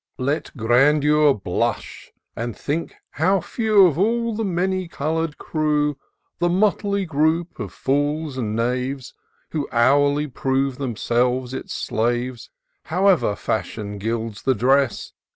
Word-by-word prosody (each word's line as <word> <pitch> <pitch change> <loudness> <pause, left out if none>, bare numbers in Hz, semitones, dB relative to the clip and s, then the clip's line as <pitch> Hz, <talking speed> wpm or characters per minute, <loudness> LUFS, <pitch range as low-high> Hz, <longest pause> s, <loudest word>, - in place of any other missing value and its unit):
ET 140 +4 -1
grandexir 145 +6 +4
blush, - - -2 0.2
and 115 0 -4
think 155 +3 -3 0.2
how 190 +6 +2
few 215 0 +3
Of 165 -3 +1
all 230 +3 +1
the 225 - -2
many 185 -1 -1
colour'd 160 -1 -2
crew, 150 -2 0 0.4
The 175 0 +2
motley 200 +1 +1
group 160 +2 0
of 100 -5 -5
fools 145 - -1
and 110 -5 -2
knaves, 125 +3 -2 0.4
Who 150 -3 -3
hourly 145 +5 +3
prove 135 -1 -1
themselves 125 0 0
its 175 +7 -5
slaves, 120 -1 -2 0.4
However 180 - +2
fashion 105 +1 -3
gilds 110 0 -3
the 130 - +1
dress. 130 +2 +1
145 Hz, 120 wpm, -22 LUFS, 125-170 Hz, 0.4 s, grandexir